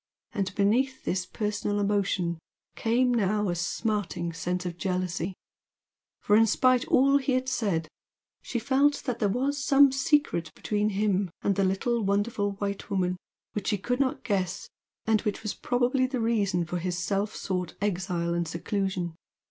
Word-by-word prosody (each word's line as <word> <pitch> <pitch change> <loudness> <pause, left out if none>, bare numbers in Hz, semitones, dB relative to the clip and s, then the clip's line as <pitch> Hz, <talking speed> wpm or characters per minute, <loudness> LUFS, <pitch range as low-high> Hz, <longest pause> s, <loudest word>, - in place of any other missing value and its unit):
And 195 -1 -2
beneath 250 +7 +1
this 185 0 -1
personal 210 -1 -2
emotion 195 -4 0 0.4
came 245 +2 +2
now 210 -2 +1
a 175 - 0
smarting 175 -1 -2
sense 180 +2 -2
of 175 -1 -3
jealousy, 180 -1 -2 0.9
for 205 - +4
in 225 +1 +6
spite 255 +3 +3
of - - -15
all 275 +2 +5
he 265 -1 0
had 255 0 0
said, 200 -11 0 0.5
she 245 - -3
felt 280 +4 +2
that 245 -3 -3
there 205 - +2
was 270 +6 0
some 280 -1 +6
secret 270 - +1
between 210 0 0
him 200 -2 +1
and 200 - +2
"the 195 - +2
little 210 +5 +1
wonderful 205 0 0
white 200 0 -4
woman," 185 -2 0 0.4
which 205 -2 -3
she 210 - +2
could 245 +6 -2
not 270 -2 0
guess 195 -6 -1 0.4
and 220 -1 +3
which 210 +1 -3
was 215 - -2
probably 250 +1 +1
the 255 -1 -3
reason 205 -6 +1
of 165 - -10
his 180 0 -2
self 200 +4 -1
sought 180 -3 -3
exile 175 -3 -1
and 170 -1 -1
seclusion. 185 0 -2
205 Hz, 165 wpm, -27 LUFS, 185-240 Hz, 0.9 s, in